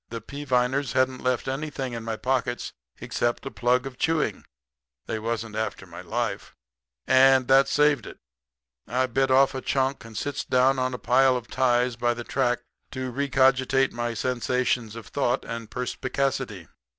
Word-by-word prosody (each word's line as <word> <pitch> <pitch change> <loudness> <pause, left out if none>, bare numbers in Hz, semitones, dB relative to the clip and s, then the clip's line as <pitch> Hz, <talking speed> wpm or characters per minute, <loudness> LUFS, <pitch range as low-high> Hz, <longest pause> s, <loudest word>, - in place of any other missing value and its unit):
The 115 - -5
Peaviners 130 0 -1
hadn't 130 0 +1
left 125 0 0
anything 135 -2 -3
in 115 -1 -5
my 115 0 -3
pockets 125 -1 -1 0.3
except 120 +2 -2
a 135 - -4
plug 125 +2 +1
of 130 -2 -8
chewing 160 -1 0 0.6
they 110 - -3
wasn't 115 -1 -3
after 110 0 -3
my - - -10
life - - -3 0.5
and 130 -1 +5
that 135 +1 +6
saved 150 -5 +2
it. - - -10 0.7
I 130 +2 +1
bit 130 +2 0
off 135 +1 +5
a 130 - -4
chunk 135 0 0
and 115 -1 -10
sits 145 +5 -3
down 130 +1 +3
on 130 0 -1
a - - -5
pile 130 +1 +3
of 120 - -9
ties 125 -2 +1
by 120 0 +1
the 120 - -6
track 120 -1 0 0.3
to 130 -1 -4
recogitate 135 0 +2
my 120 -1 -3
sensations 125 -1 -1
of 115 - -8
thought 130 -2 -1
and 115 -1 -6
perspicacity. 125 - -2
130 Hz, 165 wpm, -25 LUFS, 120-135 Hz, 0.7 s, that